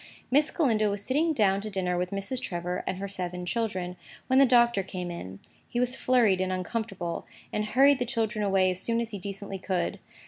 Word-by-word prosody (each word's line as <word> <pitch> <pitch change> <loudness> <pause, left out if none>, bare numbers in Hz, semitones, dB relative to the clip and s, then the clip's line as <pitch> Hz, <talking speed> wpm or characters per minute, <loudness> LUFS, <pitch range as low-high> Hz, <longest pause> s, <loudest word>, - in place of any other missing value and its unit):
Miss 290 +3 +4
Galindo 220 -9 +2
was 200 0 -2
sitting 310 +5 +2
down 200 -8 +2
to 215 - -5
dinner 185 -3 -1
with 180 0 -1
Mrs. 200 +7 -2
Trevor 175 -5 -3
and 185 - -1
her 200 +1 -4
seven 180 -2 -4
children, 185 -4 -2 0.3
when 260 +1 +4
the 275 - +7
Doctor 235 -4 +4
came 180 -2 -5
in. 95 - -7 0.3
He 240 - -2
was 250 0 +4
flurried 230 -9 +3
and 185 0 0
uncomfortable, 185 -2 -3 0.3
and 210 - 0
hurried 270 +5 +5
the 245 - 0
children 220 -2 -1
away 190 -2 +3
as 180 - -2
soon 230 +2 +1
as 230 -1 -2
he 205 - -5
decently 195 0 -6
could. 185 -2 -2
200 Hz, 205 wpm, -28 LUFS, 185-235 Hz, 0.3 s, the